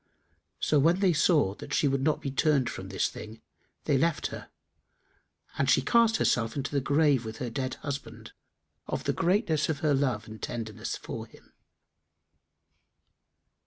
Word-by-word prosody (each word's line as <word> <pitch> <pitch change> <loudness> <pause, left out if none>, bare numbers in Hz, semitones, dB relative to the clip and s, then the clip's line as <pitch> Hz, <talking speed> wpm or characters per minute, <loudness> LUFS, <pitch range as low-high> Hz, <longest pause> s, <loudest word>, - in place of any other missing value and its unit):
So, 150 - +2
when 165 +6 +3
they 190 -3 +3
saw 150 - +3 0.2
she 145 - +2
would 135 -1 0
not 150 +2 +1
be 140 - -2
turned 140 -1 +2
from 95 0 -7
this 95 - 0
thing, 110 +1 -9 0.4
they 140 - +2
left 165 +1 +1
her, - - -8 1.1
and - - +2
she - - +4
cast 230 -2 +4
herself 115 -2 +1
into 140 -1 -3
the 140 -1 0
grave 140 -2 +3
with 110 0 -7
her 120 -2 -4
dead 130 +2 -3
husband, 140 -1 -7 0.6
of - - -3
the - - 0
greatness 165 -4 +1
of 150 -3 -2
her 150 -2 +2
love 130 -6 0
and 110 0 -10
tenderness 115 -3 -4
for - - -7
him." - - -20
140 Hz, 160 wpm, -28 LUFS, 120-155 Hz, 1.1 s, she